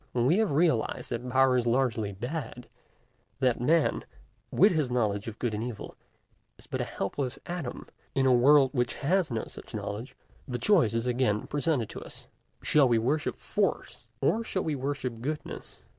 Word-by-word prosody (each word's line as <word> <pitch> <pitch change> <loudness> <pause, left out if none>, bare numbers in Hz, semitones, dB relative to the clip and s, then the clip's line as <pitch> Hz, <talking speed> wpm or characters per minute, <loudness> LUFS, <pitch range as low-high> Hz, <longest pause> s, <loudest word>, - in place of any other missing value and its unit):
When 120 -1 +1
we 165 +10 +4
have 220 -3 +2
realized 145 -7 +1
that 120 +1 -3
Power 130 0 +4
is 120 -1 0
largely 115 -4 +1
bad, 125 - -5 0.7
that 125 -3 +1
man, 160 +4 +2 0.5
with 200 +4 +5
his 155 -6 +1
knowledge 105 -4 0
of 115 -1 -6
good 120 -3 -2
and 105 +1 -2
evil, 120 -4 -6 0.6
is - - -13
but - - -3
a - - -1
helpless 125 +6 -3
atom 170 -8 -5 0.3
in 135 - +2
a 130 - +5
world 135 +2 +6
which 125 -3 0
has 180 +3 +1
no 115 -3 -2
such - - -10
knowledge, 110 +6 -5 0.3
the 125 -2 -2
choice 125 - +3
is 115 +1 0
again 125 -4 +1
presented 145 -5 0
to - - -7
us: - - -12 0.4
Shall 145 -3 +5
we 120 -2 +3
worship 140 +7 0
Force, 145 - -2
or 215 +12 +2
shall 190 -4 -2
we 155 - -1
worship 130 -4 -3
Goodness? 150 +4 -6
130 Hz, 175 wpm, -28 LUFS, 120-150 Hz, 0.7 s, world